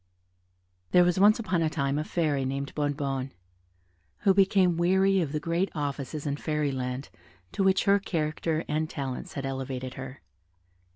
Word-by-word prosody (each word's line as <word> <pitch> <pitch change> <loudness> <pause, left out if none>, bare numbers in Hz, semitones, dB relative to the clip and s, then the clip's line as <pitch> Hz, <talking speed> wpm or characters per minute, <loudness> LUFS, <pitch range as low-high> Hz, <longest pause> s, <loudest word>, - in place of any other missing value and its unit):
There 180 - +7
was 180 +1 +2
once 210 +2 +6
upon 190 -7 -1
a 160 - +2
time 140 -2 -1
a - - -1
Fairy 155 -5 0
named 135 +1 -3
Bonnebonne, 140 -3 -2 0.9
who 195 - +4
became 190 -2 +4
weary 190 +3 +3
of 155 -5 -2
the 150 - -1
great 170 +5 0
offices 145 0 -4
in 145 -1 -1
Fairy 150 -2 -1
Land 130 +1 -4 0.4
to 195 - -1
which 190 0 +3
her 200 0 +4
character 160 -2 -2
and 155 +1 -1
talents 140 +6 -5
had 140 -5 -4
elevated 130 -1 -4
her. 130 -5 -9
150 Hz, 160 wpm, -28 LUFS, 140-180 Hz, 0.9 s, There